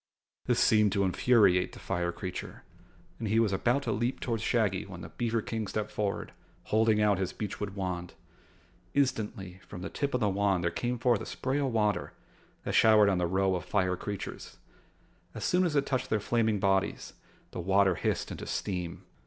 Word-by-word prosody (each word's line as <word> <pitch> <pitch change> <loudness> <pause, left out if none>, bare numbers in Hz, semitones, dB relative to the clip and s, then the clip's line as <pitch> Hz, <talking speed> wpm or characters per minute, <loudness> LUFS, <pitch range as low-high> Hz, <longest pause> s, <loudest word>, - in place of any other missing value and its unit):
This - - +2
seemed 105 -2 +4
to 100 - +2
infuriate 95 -2 +3
the - - -10
fire 85 -2 -2
creature 90 +1 -7 0.6
and 115 - -3
he 110 +2 +2
was 110 -4 +2
about 120 +8 +1
to 120 - -1
leap 120 +5 -1
toward 115 -3 -2
Shaggy 110 -6 +1
when 90 -3 -9
the - - -8
beaver 115 -2 -1
King 110 -2 -3
stepped 105 +1 -3
forward, 105 -2 -3 0.3
holding 110 0 +2
out 105 -3 +3
his 95 - -2
beechwood 105 -1 -5
wand. 90 -3 -4 0.8
Instantly, 105 -9 -1
from 90 -2 -8
the 95 - -5
tip 140 -2 -2
of - - +1
the 105 - +2
wand 100 -2 +1
there 85 - +1
came 125 0 -2
forth 120 -2 +2
a - - -6
spray 135 +2 -2
of 140 - +1
water 105 -5 0 0.5
that - - -3
showered 110 -2 +6
on 95 -2 +1
the 90 - +1
row 95 +2 +1
of 90 - -2
fire 95 -3 +1
creatures. 100 +1 -6 0.8
As - - -4
soon 180 +1 +3
as 165 -4 0
it 140 -1 +2
touched 130 -2 -1
their 110 - +1
flaming 110 0 +1
bodies, 95 0 0 0.4
the - - -6
water 95 +1 +3
hissed - - -2
into - - -6
steam. 90 -4 -3
105 Hz, 190 wpm, -30 LUFS, 95-115 Hz, 0.8 s, showered